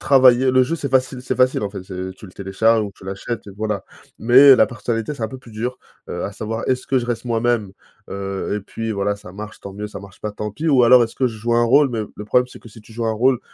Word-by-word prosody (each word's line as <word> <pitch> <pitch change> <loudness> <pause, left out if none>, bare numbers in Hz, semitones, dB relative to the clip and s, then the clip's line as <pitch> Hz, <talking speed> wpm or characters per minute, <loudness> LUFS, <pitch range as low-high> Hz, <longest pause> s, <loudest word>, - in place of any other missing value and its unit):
travailler. 130 -1 +5
Le 130 0 +5
jeu 165 +6 -1
c'est 145 - -4
facile 130 -1 +1
c'est - - -2
facile 130 -3 +2
en 100 - -3
fait, 100 -2 -7
c'est 95 0 -6
tu - - -12
le 90 - -13
télécharges 110 +4 +1
ou 100 - -7
tu - - -16
l'achètes 100 +4 -5
et - - -8
voilà. 105 -2 -3 0.4
Mais 130 +4 +8
la - - +5
personnalité 115 +2 -3
c'est 120 -6 -4
un - - -2
peu 130 - -9
plus 125 -2 -16
dur, 115 +4 -4 0.3
heu, - - -4
à - - -3
savoir 110 +2 -5
est-ce 130 0 0
que 135 -2 +2
je 120 - -5
reste 120 0 -3
moi-même? 115 -4 0 0.4
Heu, 100 0 -4
et - - -4
puis 110 +3 -5
voilà 100 0 -1
ça 90 -3 -13
marche 105 +2 -9
tant 100 - -8
mieux 105 +1 -6
ça - - -8
marche 100 -2 -14
pas 105 - -3
tant 105 0 -5
pis, 160 +9 -2
ou 130 -4 +5
alors 125 +1 +7
est-ce 115 - -3
que 130 - +2
je 115 -3 -4
joue 120 +2 -2
un 120 - +4
rôle? 140 +4 +5
Mais 115 -2 -2
le 105 - -8
problème 125 +4 +2
c'est 125 - -14
que 115 - -13
si 110 +1 -14
tu 110 - -17
joues 115 0 -3
un 110 - +1
rôle, 125 +3 +2
115 Hz, 290 wpm, -20 LUFS, 105-125 Hz, 0.4 s, Mais